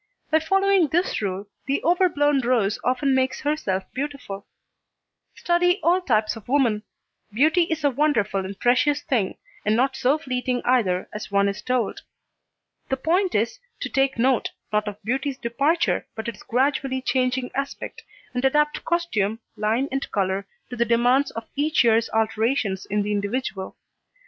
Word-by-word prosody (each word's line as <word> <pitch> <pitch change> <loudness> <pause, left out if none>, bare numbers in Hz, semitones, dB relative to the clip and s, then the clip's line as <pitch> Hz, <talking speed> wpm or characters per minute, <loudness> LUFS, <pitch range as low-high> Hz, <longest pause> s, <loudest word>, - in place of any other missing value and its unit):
By 315 - +5
following 390 +1 +3
this 345 0 0
rule 195 0 -3 0.2
the 275 +1 +1
overblown 305 -5 +3
rose 235 -5 +1
often 260 +2 +1
makes 260 0 +1
herself 290 -11 -1
beautiful. 270 -8 -5 0.9
Study 355 +2 +2
all 355 +3 +3
types 215 -8 +1
of 225 - -12
woman. 245 -6 +2 0.5
Beauty 315 - +3
is 320 -2 -3
a 285 - +3
wonderful 235 -9 +1
and 195 +1 -7
precious 285 +4 +2
thing, 220 -8 0 0.3
and 210 +1 +2
not 265 +3 +2
so 270 +3 +2
fleeting 255 -4 -2
either 205 -8 +2
as 210 - -6
one 200 0 +3
is 200 0 -3
told. 250 -4 -1 0.9
The 265 - 0
point 350 +7 +1
is, 225 - 0 0.2
to - - -3
take 270 -1 +1
note, 250 +1 +2 0.2
not 210 0 +1
of 205 -1 -4
beauty's 265 +4 -1
departure, 280 +8 0
but 220 0 -5
its 235 - -6
gradually 260 +1 0
changing 255 0 0
aspect, 275 +1 -4 0.3
and 250 0 -2
adapt 300 +3 +2
costume, 225 - 0 0.2
line 225 +6 0
and 270 +1 -2
colour, 195 0 -1 0.2
to - - -4
the 235 - +2
demands 245 +4 +3
of 230 0 -7
each 300 +1 +2
year's 230 -1 +3
alterations 220 -2 0
in 205 0 0
the 210 - -2
individual. 205 -1 -3
255 Hz, 155 wpm, -24 LUFS, 215-290 Hz, 0.9 s, By